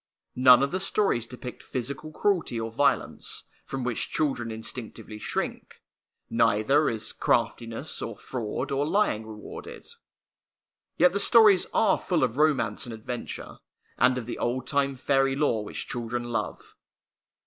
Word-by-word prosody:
None 125 0 +7
of 140 - 0
the 185 - -1
stories 195 - +1
depict 125 0 -8
physical 140 +5 -5
cruelty 170 - 0
or 115 0 -4
violence, 145 +5 0 0.2
from 135 -1 -4
which 120 -2 0
children 135 -6 -1
instinctively 110 -1 -5
shrink; - - -4 0.5
neither 115 +6 +3
is 110 -2 -1
craftiness 115 +5 -1
or 115 -3 -5
fraud 115 -2 -4
or 140 +1 +1
lying 155 - +1
rewarded. 105 -1 -9 1.1
Yet 180 +1 +5
the 200 - +1
stories 210 -3 +6
are 215 -3 +3
full 170 -6 0
of 125 0 0
romance 135 -8 +2
and 120 - -6
adventure, 115 +2 -6 0.4
and 125 0 +3
of 125 - -4
the 120 - -5
old 125 +2 -1
time 140 0 +1
fairy 135 +1 +2
lore 130 -7 +1
which - - -5
children 120 0 -3
love. 115 - -4
125 Hz, 140 wpm, -27 LUFS, 115-145 Hz, 1.1 s, None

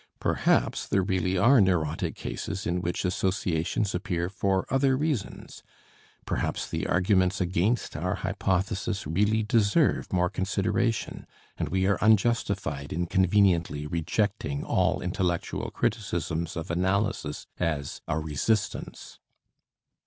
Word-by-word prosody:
Perhaps - - +1
there 95 - +2
really 95 -1 0
are 120 +6 +6
neurotic 85 -5 0
cases 100 0 -5
in 90 +1 -1
which 90 +2 -2
associations 95 +1 0
appear 90 -1 -2
for 95 0 0
other 135 0 +3
reasons, 145 -7 -3 0.6
perhaps - - -2
the - - -3
arguments 95 0 +2
against 95 +6 0
our 90 +5 -1
hypothesis 95 +2 -1
really 105 +8 +1
deserve 115 +6 +2
more 90 -1 +2
consideration 100 +5 -1 0.3
and - - -3
we 95 +1 +1
are 100 +1 +2
unjustified 100 -9 +1
in 85 +3 -1
conveniently 90 -5 +2
rejecting 85 -1 -1
all - - +1
intellectual 90 -1 -2
criticisms 85 -6 -2
of 80 0 -4
analysis 95 -3 -1
as 75 -5 -2
a 80 - 0
resistance. 80 +8 -2
95 Hz, 115 wpm, -27 LUFS, 85-105 Hz, 0.6 s, are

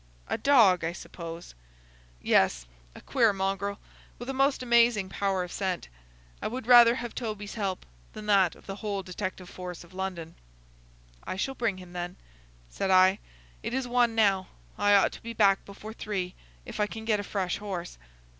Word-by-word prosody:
"A - - -1
dog, 220 -11 +5
I 165 +1 -1
suppose." 170 -1 -9 0.7
"Yes,—a - - 0
queer 235 -5 +3
mongrel, 195 +1 -2 0.4
with 245 +3 -5
a - - -5
most 270 0 +2
amazing 235 -5 +4
power 195 -1 0
of 180 - -8
scent. 185 - -3 0.5
I - - -1
would 250 +1 -5
rather 240 -1 +8
have 240 -2 -5
Toby's 215 -4 -5
help 195 -4 -3 0.3
than 215 - -8
that 200 -3 +4
of - - -19
the 195 0 -6
whole 200 -2 -3
detective 185 0 -5
force 180 -1 -8
of 170 - -18
London." 185 -3 -5 0.9
"I - - -4
shall 270 +8 -2
bring 230 -7 -1
him, 180 -1 -12
then," 175 0 -4 0.5
said - - -3
I. 185 +1 +5 0.4
"It 245 - -3
is 265 -1 -1
one 240 -2 +2
now. 200 -4 +3 0.3
I 205 0 +4
ought 200 - +4
to - - -11
be 230 0 -6
back 200 -3 +4
before 210 +2 -9
three, 190 -5 -3 0.3
if - - -8
I 210 - +2
can 220 +1 -8
get 215 -2 +2
a - - -3
fresh 190 -3 -2
horse." 185 - -6
200 Hz, 175 wpm, -28 LUFS, 185-225 Hz, 0.9 s, rather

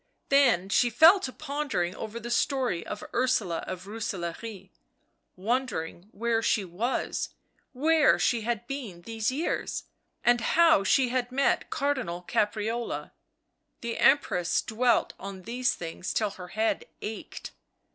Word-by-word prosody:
Then 245 -10 +4
she 240 +4 +3
fell 320 - +7
to 260 - -4
pondering 280 - -2
over 220 +2 -6
the 235 +1 -6
story 250 - +1
of - - -6
Ursula 225 -9 +1
of 185 0 -6
Rooselaare, 195 -1 -5 0.6
wondering 205 -4 -2
where 230 +1 0
she 215 -3 +1
was, 205 +9 -2 0.4
where 305 +3 +4
she 235 -2 +1
had 235 0 -2
been 235 -11 -6
these 225 +3 -1
years, 300 +6 -2 0.4
and 240 -1 +4
how 320 -3 +5
she 255 +5 +3
had 250 0 -1
met 275 +2 +1
Car 285 +1 +1
dinal 180 -10 -5
Caprarola.... 220 +4 -1 0.7
The 235 -1 -4
Empress 225 -11 +3
dwelt 240 +1 +1
on 195 -1 -8
these 245 +3 0
things 165 +2 -5
till 210 -2 +1
her 180 -2 -9
head 220 +4 -1 0.2
ached. 215 +1 -6
230 Hz, 135 wpm, -28 LUFS, 195-255 Hz, 0.7 s, fell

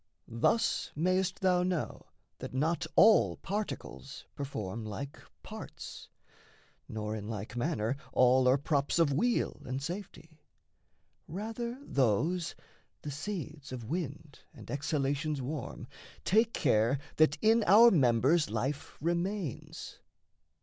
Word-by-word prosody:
Thus 115 - +1
mayst 185 +4 +1
thou 180 -2 +3
know 180 -3 -2 0.3
that - - -7
not 160 +4 0
all 220 0 +6
particles 200 -8 -5
Perform 115 -6 -5
like 135 +7 -6 0.2
parts, - - -9 0.8
nor 110 0 -3
in 105 -1 -6
like 110 +1 -5
manner 120 -2 0 0.2
all 125 0 +5
Are 130 +2 +5
props 140 +1 0
of 165 -4 +3
weal 235 - 0
and 130 +1 -3
safety: 165 -1 -7 0.9
rather 225 +6 -4
those 155 - +1 0.5
The 150 - -4
seeds 155 -2 -6
of 125 -2 -5
wind 155 -3 -4 0.2
and - - -10
exhalations 145 +1 -1
warm 135 +1 -5 0.4
Take 220 +4 +4
care 115 - +2 0.2
that 155 -2 +4
in 225 +3 +4
our 225 +6 +8
members 135 +2 +3
life 130 +7 -3
remains. 175 - -3
150 Hz, 115 wpm, -31 LUFS, 130-180 Hz, 0.9 s, our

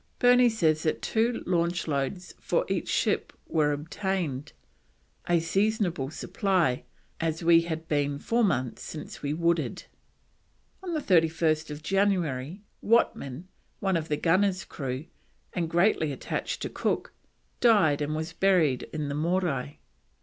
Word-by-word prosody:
Burney 245 -1 +6
says 160 -9 +1
that 155 - -1
two 230 +2 0
launch 175 -1 0
loads 150 +5 -2
for - - 0
each - - -2
ship - - 0
were 150 -2 +1
obtained, 150 -2 -3 0.8
"a 175 -1 +4
seasonable 185 -4 0
supply, 170 - 0 0.3
as 165 0 -2
we 165 0 +6
had 160 -1 -5
been 145 -2 0
four 230 +10 +1
months 130 - 0
since 155 - -8
we 145 - -2
wooded." 170 +1 0 1.0
On 380 - -6
31st 160 - +1
January 180 -4 0 0.2
Whatman, 165 - +1 0.4
one 190 -2 +1
of 160 -1 -1
the 150 - 0
gunner's 185 +3 +2
crew, 135 0 -5 0.5
and 170 -2 -1
greatly 170 -3 +2
attached 135 - -4
to - - -3
Cook, - - -2 0.5
died 195 -12 +4
and 150 +1 -1
was 160 +2 -4
buried 170 -8 +2
in 155 -2 -3
the 140 - -3
Morai. 155 -3 -1
165 Hz, 130 wpm, -27 LUFS, 150-190 Hz, 1.0 s, Burney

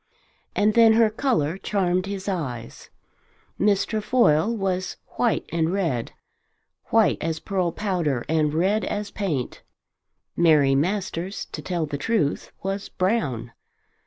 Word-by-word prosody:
And 210 +1 +3
then 230 -1 +6
her 225 -1 +4
colour 210 - 0
charmed 185 -2 0
his 200 -1 -5
eyes. 130 - -4 0.7
Miss 200 -1 +3
Trefoil 215 -5 +2
was 190 -4 -2
white 240 -3 0
and 165 0 0
red; 165 -12 -1 0.7
white - - +3
as 160 0 -2
pearl 185 -2 -1
powder 170 - -1
and 155 -1 +2
red 190 +7 +1
as 205 +2 -3
paint. 155 - -3 0.7
Mary 155 -5 +4
Masters, 180 +4 -1
to - - -5
tell 175 -3 -2
the 145 -1 -5
truth, 155 -4 0
was 195 +1 -3
brown. 145 - -1
185 Hz, 125 wpm, -24 LUFS, 155-205 Hz, 0.7 s, then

